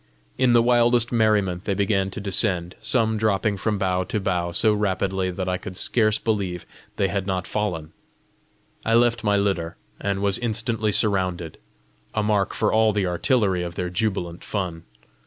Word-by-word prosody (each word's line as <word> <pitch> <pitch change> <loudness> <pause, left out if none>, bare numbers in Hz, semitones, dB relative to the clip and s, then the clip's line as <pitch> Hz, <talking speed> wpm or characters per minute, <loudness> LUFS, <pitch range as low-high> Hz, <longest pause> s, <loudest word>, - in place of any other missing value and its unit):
In 125 -2 +3
the 120 -1 +5
wildest 120 0 +3
merriment 105 -5 +1
they 100 - 0
began 95 -1 +1
to 95 - -6
descend, 95 -3 0
some 110 -4 +1
dropping 105 -1 +1
from 105 +2 -1
bough 95 -1 0
to 105 - -2
bough 90 -3 -1
so 110 +5 +3
rapidly 95 -2 -1
that 90 +1 -4
I 90 0 0
could 90 0 -8
scarce 110 -3 +2
believe 100 -6 -2 0.3
they 100 - +1
had 95 -1 -3
not 95 -2 -1
fallen. 85 -7 -3 0.9
I 115 - +2
left 120 -1 +3
my 105 -1 +2
litter, 95 -5 -1 0.2
and 100 0 -2
was 100 -1 +2
instantly 115 -2 -1
surrounded 90 -5 0 0.6
a 110 - +1
mark 105 -2 0
for 105 - +1
all 110 -1 +3
the 100 -2 0
artillery 95 +1 +1
of 85 -1 -5
their 90 0 -3
jubilant 90 -3 -2
fun. 90 -5 -4
100 Hz, 170 wpm, -23 LUFS, 90-110 Hz, 0.9 s, the